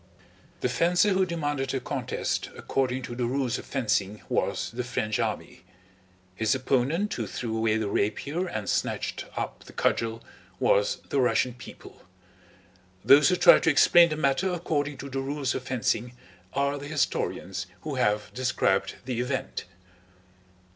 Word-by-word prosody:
The - - +2
fencer 175 +9 +3
who 190 -1 +2
demanded 145 -5 -2
a - - 0
contest - - -3
according 130 -1 -1
to 120 - -6
the 120 -1 -1
rules 130 -1 -1
of - - -11
fencing 105 -5 -1
was - - -1
the 125 +2 -3
French 110 -4 -2
army; - - -3 0.7
his 110 +5 +1
opponent 135 +10 0
who 115 -3 -3
threw 115 +1 -4
away 110 -1 +2
the 110 -2 -1
rapier 140 - -1
and 110 - -4
snatched - - -1
up - - -4
the - - -13
cudgel 115 0 0 0.4
was - - +3
the 140 - +1
Russian 125 0 +2
people; 120 - -13 1.0
those 145 +4 +7
who 180 - +3
try - - +7
to - - +2
explain 170 +3 +6
the 155 - -3
matter 155 +6 +1
according 150 -5 -2
to 140 - -7
the 135 0 -3
rules 140 -1 -2
of - - -3
fencing 125 -2 -1 0.4
are 140 +1 0
the 145 - -7
historians 145 - -2
who 155 - -5
have 105 -5 0
described 125 -6 0
the 125 -2 -2
event. 130 +2 -3
130 Hz, 155 wpm, -27 LUFS, 120-150 Hz, 1.0 s, those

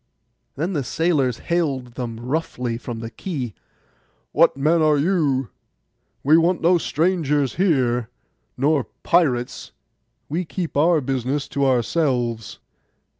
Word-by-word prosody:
Then 165 +7 -2
the 145 -5 -1
sailors 140 -5 +1
hailed 140 -8 -1
them 120 -3 -5
roughly 125 -2 -2
from 120 -2 -6
the 115 0 -6
quay, 130 - -5 0.8
'What - - +4
men 160 +4 +3
are 155 -1 +4
you?—we 140 - -1
want 175 +1 +2
no 175 +1 +4
strangers 150 -5 0
here, 125 - +1 0.5
nor 140 -1 +2 0.2
pirates. 135 -8 +1 0.5
We 165 +5 -2
keep 175 0 -5
our 160 +2 +4
business 135 +2 -2
to 140 0 +1
ourselves. 120 - 0
140 Hz, 115 wpm, -22 LUFS, 125-165 Hz, 0.8 s, What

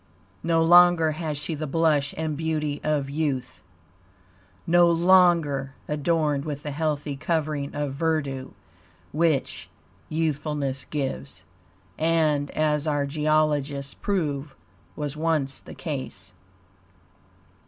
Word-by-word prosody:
No 165 -1 +2
longer 175 -1 +6
has 155 -1 -4
she 150 +3 -3
the 155 0 -4
blush 150 -2 +1
and 160 -1 -2
beauty 155 -2 -2
of 150 -3 0
youth, 140 -3 -3 1.0
no 175 0 +5
longer 170 -6 +3
adorned 150 -1 0
with 145 -1 -5
the 150 - -4
healthy 150 -1 -2
covering 150 -1 -2
of 145 -2 -2
verdue 140 -3 -2 0.6
which 155 -3 0 0.4
youthfulness 150 -3 -2
gives, 140 -1 -4 0.6
and 155 -3 +2
as 150 -1 +1
our 145 -2 +1
geologists 145 -2 0
prove 150 -8 -2 0.4
was 150 -1 -4
once 155 -4 -1
the - - -12
case. 130 - -6
150 Hz, 105 wpm, -25 LUFS, 140-160 Hz, 1.0 s, longer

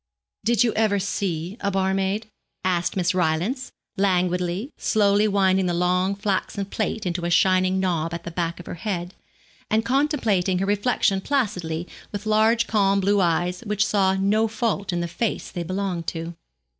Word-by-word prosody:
'Did 235 -1 +3
you 230 - +1
ever 215 -2 +2
see 190 -1 -2
a 200 - -1
barmaid?' 195 +2 0 0.4
asked 180 0 0
Miss 180 -1 +1
Rylance, 180 - 0 0.3
languidly, 180 - 0
slowly 205 -1 +2
winding 190 -2 +2
the 175 - 0
long 180 +2 +1
flaxen 200 0 -2
plait 215 +1 -3
into 175 -1 -2
a 170 - 0
shining 185 +1 +3
knob 170 -3 0
at 170 0 -5
the 170 - -6
back 170 0 -2
of 175 - -9
her - - -6
head, 175 -1 -4 0.6
and 220 +1 +1
contemplating 235 - +1
her 190 - 0
reflection 205 -1 +1
placidly 180 - -1 0.2
with 205 0 -5
large 220 +2 +3
calm 200 -2 +2
blue 200 +1 +2
eyes 175 +1 +1
which 210 0 +1
saw 190 -2 +2
no 205 +3 +2
fault 215 -3 -1
in 175 -1 -1
the 170 - -2
face 215 +6 -3
they 175 - -4
belonged 185 -1 -3
to. 165 +1 -4
190 Hz, 165 wpm, -24 LUFS, 180-210 Hz, 0.6 s, Did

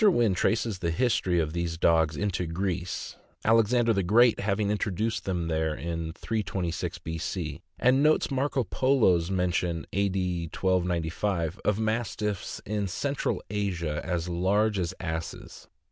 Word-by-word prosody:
Wynn 120 - +5
traces 110 +2 0
the 85 -2 -1
history 90 -2 +1
of 80 -1 -1
these 85 -1 -2
dogs 80 -2 +3
into 95 -4 -1
Greece, 90 +1 -3 0.3
Alexander 115 +1 +4
the 100 - +1
Great 115 +6 +5
having 100 0 0
introduced 105 +2 -1
them 90 -3 -1
there 80 -1 0
in 85 0 -4
326 95 -4 -3
B. 80 0 -5
C., - - -4 0.2
and 130 +2 +4
notes 155 0 +3
Marco 135 0 +1
Polo's 105 -9 +2
men 90 -2 +1
tion 85 -2 -1
(A. 100 +1 +2
D. 90 -3 -1
1295) 90 0 -1
of 105 -1 +2
Mastiffs 110 -3 -2
in 105 -1 -1
Central 140 +9 -2
Asia 90 -7 -1
as 85 -1 -2
large 100 +4 +1
as 90 0 -2
asses. 80 -1 -6
95 Hz, 145 wpm, -28 LUFS, 85-110 Hz, 0.3 s, Wynn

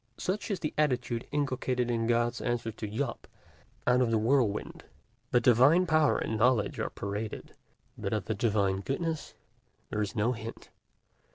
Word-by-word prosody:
Such 200 +4 -2
is 200 - -1
the 155 - -2
attitude 125 -5 0
inculcated 130 -4 0
in 115 -1 0
God's 120 0 +1
answer 120 -2 -1
to 110 0 -6
Job 120 +4 -3 0.6
out 125 0 +4
of 125 - +2
the 115 - +2
whirlwind: 115 -2 +1 0.5
the 120 - +4
divine 130 +9 +5
power 155 -3 +3
and 110 -1 -2
knowledge 120 -2 +2
are - - -1
paraded, 105 +2 -5 0.4
but 100 - -4
of 105 -3 -1
the 110 - -1
divine 100 -3 +1
goodness 155 - -3 0.6
there 105 - -1
is 105 +3 -3
no 110 +2 +2
hint. 115 -1 -7
120 Hz, 160 wpm, -30 LUFS, 110-135 Hz, 0.6 s, divine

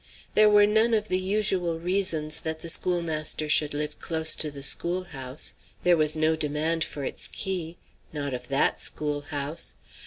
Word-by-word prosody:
There 215 0 +6
were 205 0 +6
none 220 +2 +3
of 215 0 -1
the 185 - +2
usual 185 -4 0
reasons 170 -4 0
that 160 0 -4
the 170 - -4
schoolmaster 160 -3 -1
should 150 0 +3
live 150 0 -3
close 160 -1 +1
to 155 - -1
the 140 -1 -7
schoolhouse. 155 -5 -2 0.3
There 175 -1 +5
was 155 -1 +4
no 160 +1 +2
demand 155 +2 -1
for 145 - -5
its - - -3
key. 175 -4 -3 0.3
Not 145 -3 -3
of 125 0 -6
that 135 0 +1
schoolhouse! 145 - -2
160 Hz, 160 wpm, -26 LUFS, 150-180 Hz, 0.3 s, There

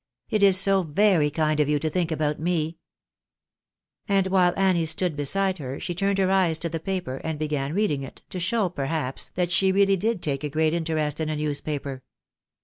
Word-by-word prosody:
" - - -52
It 215 - +1
is 195 -2 +6
so 195 0 +3
very 170 -1 +2
kind 155 0 0
of 150 -1 +2
you 150 - +2
to 150 +2 -2
think 170 +1 -1
about 150 -1 -1
me! 165 -1 -1 0.6
" - - -57
And 195 -1 +3
while 185 -2 +3
Annie 190 -3 +3
stiU 160 - -1
stood 170 0 +1
beside 190 +6 0
her, 135 -1 -5
she 175 - -4
turned 195 +2 0
her 190 -1 +2
eyes 180 -4 +2
to 170 +1 -3
the 165 0 -4
paper, 180 -7 -3
and 160 +2 -4
began 150 -1 -2
reading 195 -10 +1
it, 135 - -10
to 185 - -4
show, 200 +3 +1
perhaps, 140 -4 -3
that 180 -1 0
she 190 +1 +3
really 195 0 +3
did 215 0 -1
take 140 -3 -1
great 155 +1 +1
interest 155 -3 -1
in 155 -1 -1
a 155 - -1
newspaper. 145 -2 -3
165 Hz, 210 wpm, -25 LUFS, 150-190 Hz, 0.6 s, is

